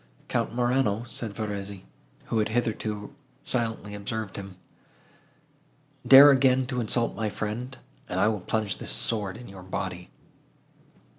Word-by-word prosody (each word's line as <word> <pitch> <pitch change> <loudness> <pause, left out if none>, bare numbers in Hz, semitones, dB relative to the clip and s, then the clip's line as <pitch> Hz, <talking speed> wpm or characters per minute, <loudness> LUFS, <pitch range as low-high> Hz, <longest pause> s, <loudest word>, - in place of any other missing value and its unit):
"Count - - 0
Morano," 120 -2 +1
said 120 -2 -6
Verezzi, 100 -3 -5 0.4
who 115 - 0
had 105 - +1
hitherto 110 -2 -2 0.3
silently 115 -4 -2
observed 105 0 -4
him, 95 -2 -8 1.5
"dare 140 +2 +10
again 130 -1 +4
to 125 -1 -2
insult 115 +1 +1
my 110 +1 -1
friend, 115 +6 -4 0.3
and 90 - -1
I 105 - +4
will 110 -3 0
plunge 110 +1 -1
this - - -4
sword 105 -3 0
in 125 - -11
your 95 -1 -11
body." 90 -1 -5
110 Hz, 135 wpm, -27 LUFS, 100-120 Hz, 1.5 s, dare